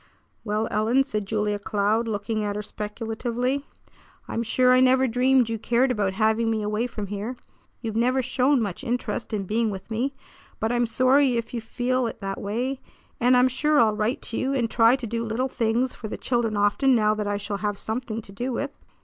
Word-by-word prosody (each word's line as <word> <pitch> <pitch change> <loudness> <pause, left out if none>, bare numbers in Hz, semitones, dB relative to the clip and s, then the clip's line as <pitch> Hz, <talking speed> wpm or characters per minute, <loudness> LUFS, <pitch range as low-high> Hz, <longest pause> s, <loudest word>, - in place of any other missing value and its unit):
"Well, 215 +1 -1
Ellen," 225 +6 +3
said 210 -7 -4
Julia 210 -1 -1
Cloud, 210 +3 0
looking 215 0 -2
at 205 -1 -2
her 210 - -3
speculatively, 235 +6 -3 0.6
"I'm 230 - -2
sure 250 +2 +3
I 255 - +6
never 260 +1 +5
dreamed 250 +1 +3
you 225 -1 -3
cared 245 +4 +2
about 205 -5 0
having 220 +2 +2
me 220 -1 0
away 210 +3 -1
from 215 -4 -5
here. 205 +5 -4 0.5
You've 225 -3 -4
never 255 +3 +2
shown 260 +1 +2
much 200 +4 -4
interest 245 -1 -2
in 210 -2 -1
being 220 +4 0
with 195 +2 -7
me. 255 +5 -1 0.4
But 220 - 0
I'm 240 -1 +1
sorry 255 +2 +3
if 230 +1 -4
you 235 - -2
feel 245 +2 -1
it - - -7
that 195 0 -4
way, 245 +6 -2 0.4
and 250 +1 +5
I'm 250 +1 +5
sure 295 +4 +2
I'll 220 -2 +4
write 220 +7 -1
to 225 - -4
you 270 +1 0
and 235 -4 0
try 230 +1 +5
to 255 -3 -5
do 230 +1 -2
little 230 +4 -1
things 235 +2 0
for 220 - -7
the - - -5
children 235 -4 0
often, 205 +6 +3
now 215 -2 +3
that 210 -1 -3
I 205 0 0
shall 200 0 -4
have 205 0 -2
something 225 0 -3
to 195 - -11
do 245 +6 -3
with." 280 +4 -2
230 Hz, 210 wpm, -25 LUFS, 210-255 Hz, 0.6 s, I